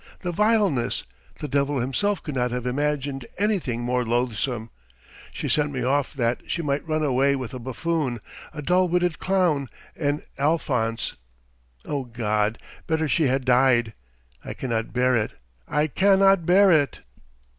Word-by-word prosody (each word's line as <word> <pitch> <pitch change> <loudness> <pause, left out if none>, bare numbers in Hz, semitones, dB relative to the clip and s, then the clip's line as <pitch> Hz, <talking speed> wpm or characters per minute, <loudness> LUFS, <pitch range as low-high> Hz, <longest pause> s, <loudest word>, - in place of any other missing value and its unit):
The 180 - -2
vileness! 205 - +1 0.4
The 150 - -3
devil 140 +1 0
himself 165 +12 0
could 150 - -5
not 125 -1 0
have 125 0 -4
imagined 140 0 -2
anything 185 - 0
more 125 +1 0
loathsome! 120 0 -1 0.6
She - - -4
sent 150 -1 +2
me 130 -3 -3
off 140 +3 0
that 120 -2 0
she 170 - -1
might 145 +2 -1
run 155 -1 0
away 140 0 +2
with 130 -3 -5
a 130 - -5
buffoon, 130 +1 -2 0.3
a 150 -2 -7
dull 180 +4 +3
witted 175 -2 +1
clown, 175 -8 +1 0.3
an 145 -1 -1 0.2
Alphonse! 130 -7 0 0.7
Oh 140 -3 -3
God, 110 -2 -1 0.3
better 160 -1 0
she 150 +1 +2
had 130 0 0
died! 125 -3 +3 0.5
I - - -6
cannot 115 -4 -2
bear 125 +1 +2
it! 110 -2 0 0.3
I 150 +1 +1
cannot 195 +2 +4
bear 190 +2 +6
it!" 145 -6 +2
140 Hz, 150 wpm, -24 LUFS, 125-160 Hz, 0.7 s, bear